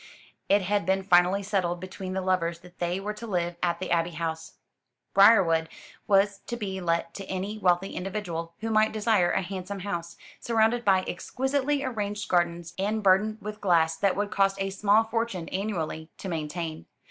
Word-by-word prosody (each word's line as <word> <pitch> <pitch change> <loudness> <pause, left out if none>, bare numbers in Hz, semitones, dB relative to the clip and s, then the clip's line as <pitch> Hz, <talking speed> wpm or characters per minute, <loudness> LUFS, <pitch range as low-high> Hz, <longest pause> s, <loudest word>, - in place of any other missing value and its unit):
It 200 0 +4
had 200 -2 0
been 190 0 +2
finally 180 +1 +4
settled 185 -4 -1
between 185 +1 -6
the 190 - -1
lovers 170 -2 0
that 180 0 -17
they 175 +2 -1
were 210 +2 -4
to 230 +2 -8
live 175 -3 -1
at 170 -1 +1
the 185 - -4
Abbey 170 0 +2
House. 160 -1 -4 0.6
Briarwood 185 -6 +5 0.4
was 200 0 +3
to 240 - -3
be 190 -4 -4
let 170 -1 -1
to 195 - -7
any 195 +3 -4
wealthy 180 0 +2
individual 175 -4 -4
who 225 0 -2
might 215 0 +3
desire 215 -5 +2
a 190 - 0
handsome 190 +1 -5
house, 170 -4 -4 0.2
surrounded 230 +1 +2
by 190 -3 +3
exquisitely 275 +7 -1
arranged 210 -5 -3
gardens, 175 -1 0
and 210 +2 -1
burdened 205 +3 +3
with 210 0 -7
glass 165 -4 +3
that 195 +3 +1
would 205 +1 -2
cost 195 -1 +2
a 195 0 -1
small 205 +3 +3
fortune 225 -6 -2
annually 170 -5 -3
to - - -7
maintain. 160 -1 -4
190 Hz, 175 wpm, -27 LUFS, 175-210 Hz, 0.6 s, Briarwood